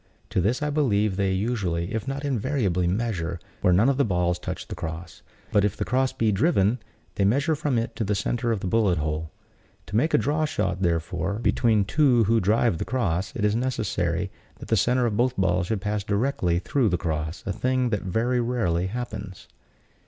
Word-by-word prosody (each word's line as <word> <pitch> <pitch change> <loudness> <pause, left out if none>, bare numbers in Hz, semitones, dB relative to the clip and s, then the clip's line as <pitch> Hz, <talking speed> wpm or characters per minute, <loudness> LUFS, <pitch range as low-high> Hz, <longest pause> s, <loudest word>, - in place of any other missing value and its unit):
To - - +1
this 115 - 0
I 150 - 0
believe 110 -9 +1
they 95 -1 +1
usually, 95 -4 -1
if 110 +1 -3
not 135 +1 -3
invariably, 115 - 0
measure, 90 -4 -2 0.2
where 90 - +4
none 100 +7 +4
of 135 -1 +2
the 140 - +4
balls 90 -4 0
touch - - -5
the - - -6
cross; 80 +2 -7 0.3
but 100 - +3
if 105 -2 0
the - - -2
cross 130 +1 +1
be 110 -2 +1
driven, 110 - +2 0.3
they - - 0
measure 140 - +2
from 145 -4 -1
it 115 0 -2
to 110 - 0
the 105 0 0
center 115 +5 -1
of 110 -4 -1
the - - -4
bullet 100 -4 +2
hole. 75 +1 -2 0.6
To 100 - -7
make 155 +9 +3
a - - +6
draw 155 +2 +1
shot, 95 -10 -2
therefore, 85 +2 -1
between 110 -1 +2
two 130 -1 +3
who 115 +2 +3
drive 105 -2 +2
the - - -1
cross, 100 -8 -1
it 110 -5 0
is 105 +1 +2
necessary 95 -7 -1 0.3
that - - -11
the 115 - +3
center 125 +5 +2
of 105 -3 -1
both 125 +2 +1
balls 90 -1 +1
should 105 -2 -1
pass 105 0 -2
directly 100 -5 0
through 115 +6 +1
the 90 - +1
cross; 80 0 -3
a 100 - -1
thing 130 +2 0
that 105 - 0
very 115 +7 0
rarely 105 -8 0
happens. 105 -4 -6
105 Hz, 205 wpm, -25 LUFS, 90-125 Hz, 0.6 s, a